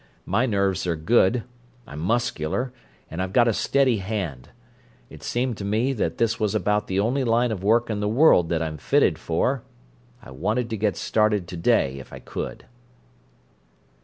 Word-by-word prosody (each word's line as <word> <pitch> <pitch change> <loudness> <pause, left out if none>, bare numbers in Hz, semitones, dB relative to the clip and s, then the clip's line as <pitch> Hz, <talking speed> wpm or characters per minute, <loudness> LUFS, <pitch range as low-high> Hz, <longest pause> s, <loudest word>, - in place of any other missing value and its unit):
My 115 +8 +1
nerves 100 -4 0
are 85 - +1
good; 110 +6 +2 0.4
I'm 75 - -9
muscular, 120 +3 -1 0.4
and 85 - -3
I've 95 0 -3
got 120 +1 +5
a 115 - +3
steady 130 +1 +2
hand; 95 - -4 0.6
it - - -12
seemed 120 -2 -2
to - - -6
me 110 +7 0
that 115 - -2
this 115 -1 +1
was 105 -2 0
about 105 0 +1
the 95 0 0
only 125 +7 +1
line 120 0 +2
of 95 -4 -4
work 115 +3 +3
in 110 -2 -2
the 105 - -1
world 110 - +5
that 80 -1 0
I'm 80 -1 -4
fitted - - +2
for. 120 +11 0 0.6
I - - -13
wanted 115 - -2
to - - -1
get 105 -1 0
started 105 -4 +1
to 90 - -6
day 70 -5 +1
if 65 - -12
I - - -8
could." - - -6
105 Hz, 180 wpm, -24 LUFS, 90-120 Hz, 0.6 s, got